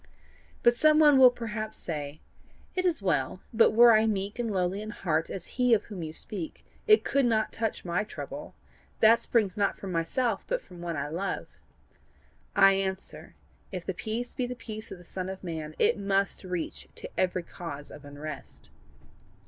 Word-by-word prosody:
"But 240 - +6
some 305 +5 +4
one 295 -3 +7
will 255 -1 +10
perhaps 220 -3 -5
say: 150 -2 -5 0.5
'It 370 0 -1
is 325 - +1
well; 185 -1 0
but 230 - +6
were 235 +1 +8
I 220 +1 +4
meek 200 +1 -2
and 235 -2 -1
lowly 190 0 0
in 215 - -6
heart 165 -6 -1
as 185 - -5 0.2
he 250 -2 +6
of 210 - -1
whom 200 -5 -8
you 155 -1 -4
speak, 170 +1 -6 0.2
it 430 0 +6
could 275 0 +2
not 220 -3 +1
touch 225 -4 -3
MY 180 +4 0
trouble: - - -8 0.4
that 225 +1 +6
springs 210 -4 +1
not 200 -1 +1
from 195 - -6
myself, 195 +7 0
but - - 0
from 180 - -13
one 170 -2 -3
I 140 +1 -2
love.' 175 +6 -4 1.0
I 195 0 +7
answer, 190 0 -4 0.4
if 185 -3 -5
the 190 - -2
peace 225 +6 -4
be 250 - -2
the 250 - -5
peace 220 -2 -6
of - - -6
the 175 - -14
Son 185 +1 -5
of 190 0 -7
man, 160 -3 -5
it - - +3
must 195 0 0
reach 180 -3 -4
to - - -7
every 180 -1 0
cause 155 -4 -8
of 145 - -11
unrest. 145 +2 -9
195 Hz, 185 wpm, -28 LUFS, 175-230 Hz, 1.0 s, will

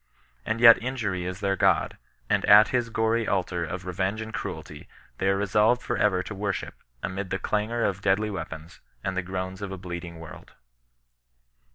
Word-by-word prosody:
And 110 +1 -1
yet 115 -1 +8
injury 110 -8 -2
is 90 +2 -5
their 100 -1 +1
god, - - +2 0.3
and - - +1
at 105 +2 +8
his 120 -2 0
gory 110 0 0
altar 90 -3 -1
of 90 +2 -5
revenge 95 +3 -2
and 110 0 -6
cruelty - - -6 0.3
they 95 - +1
are 95 - +2
resolved 105 +4 +2
for 120 - -2
ever 95 -5 +2
to 110 - -7
worship, 100 -1 -3 0.3
amid 95 0 -4
the 95 - -1
clangor 110 +4 -1
of 100 -1 -1
deadly 105 +2 +1
weapons, 80 -3 -7 0.2
and 95 - -2
the 95 - 0
groans 95 +1 -5
of 100 -1 -5
a 95 - -5
bleeding 85 -2 -7
world. 80 -2 -12
95 Hz, 180 wpm, -26 LUFS, 90-110 Hz, 0.3 s, yet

